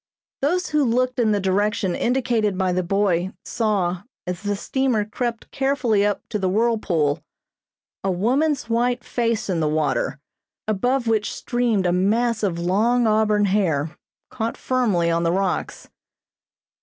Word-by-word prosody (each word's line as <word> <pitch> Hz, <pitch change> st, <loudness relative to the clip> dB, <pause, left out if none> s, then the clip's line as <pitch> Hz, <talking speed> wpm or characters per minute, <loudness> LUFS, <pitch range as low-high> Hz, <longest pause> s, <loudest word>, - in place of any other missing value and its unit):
Those 355 Hz, +6 st, 0 dB
who 300 Hz, -1 st, +2 dB
looked 250 Hz, +1 st, +1 dB
in 225 Hz, -3 st, +3 dB
the 205 Hz, -, +2 dB
direction 195 Hz, 0 st, 0 dB
indicated 230 Hz, -5 st, 0 dB
by 185 Hz, -1 st, +1 dB
the 185 Hz, -, +1 dB
boy 185 Hz, 0 st, 0 dB
saw, 190 Hz, -6 st, 0 dB, 0.2 s
as 180 Hz, -1 st, -4 dB
the 205 Hz, 0 st, -1 dB
steamer 250 Hz, -1 st, 0 dB
crept 235 Hz, +2 st, -4 dB
carefully 270 Hz, -7 st, +1 dB
up 205 Hz, 0 st, 0 dB
to 210 Hz, -, -2 dB
the 190 Hz, -1 st, 0 dB
whirlpool, 185 Hz, -9 st, +1 dB, 0.8 s
a 195 Hz, -, 0 dB
woman's 255 Hz, -, +1 dB
white 240 Hz, +1 st, 0 dB
face 230 Hz, -2 st, -1 dB
in 180 Hz, -4 st, 0 dB
the 155 Hz, -, +1 dB
water, 150 Hz, -3 st, 0 dB, 0.5 s
above 245 Hz, +5 st, +1 dB
which 220 Hz, -2 st, +1 dB
streamed 235 Hz, -6 st, 0 dB
a 175 Hz, -, +3 dB
mass 220 Hz, +6 st, +1 dB
of 190 Hz, -5 st, 0 dB
long 215 Hz, +8 st, +2 dB
auburn 215 Hz, -1 st, +3 dB
hair, 170 Hz, -6 st, 0 dB, 0.4 s
caught 225 Hz, +1 st, -3 dB
firmly 210 Hz, -10 st, +1 dB
on 165 Hz, 0 st, +1 dB
the 170 Hz, 0 st, +1 dB
rocks. 190 Hz, 0 st, -2 dB
210 Hz, 145 wpm, -22 LUFS, 185-240 Hz, 0.8 s, in